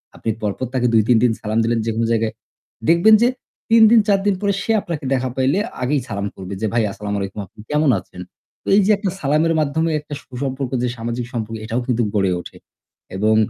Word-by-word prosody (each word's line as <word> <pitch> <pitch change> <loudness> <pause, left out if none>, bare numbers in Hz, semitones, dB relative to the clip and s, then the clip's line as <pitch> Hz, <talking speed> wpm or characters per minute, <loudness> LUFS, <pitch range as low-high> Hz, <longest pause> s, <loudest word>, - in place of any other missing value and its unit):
আপনি - - -4
পরপর 105 +4 -2
তাকে 125 -2 +1
২-৩ 115 +2 +4
দিন 125 - +4
সালাম 110 +1 -2
দিলেন 115 0 +1
যেকোনো 115 0 0
জায়গায়। 115 -1 0 0.6
দেখবেন 170 +6 +6
যে 240 - +5 0.4
৩ 230 0 +6
দিন 235 - +7
৪ 200 -1 +4
দিন 205 -2 +3
পরে 200 -1 +1
সে 225 - -1
আপনাকে 165 -7 -5
দেখা 130 -1 0
পাইলে 135 +8 +2 0.2
আগেই 135 +3 +1
সালাম 100 -1 -3
করবে 95 +1 -7
যে - - 0
"ভাই 115 -1 +2
আসসালামু 105 0 -4
আলাইকুম। 100 +1 -5
আপনি 95 - -25
কেমন 150 0 +2
আছেন?" 90 0 -12 0.4
তো - - -17
এই 205 - +6
যে 215 - +4
একটা 200 -1 -2
সালামের 155 +3 +2
মাধ্যমে 160 +2 0
একটা 150 0 -10
সুসম্পর্ক 130 0 -4
যে - - +1
সামাজিক 120 +1 -3
সম্পর্ক 115 -1 -3
এটাও 115 +3 -1
কিন্তু 120 -2 +1
গড়ে 95 -3 +2
ওঠে। - - -12 0.6
এবং 110 +3 +2
125 Hz, 205 wpm, -20 LUFS, 110-155 Hz, 0.6 s, দিন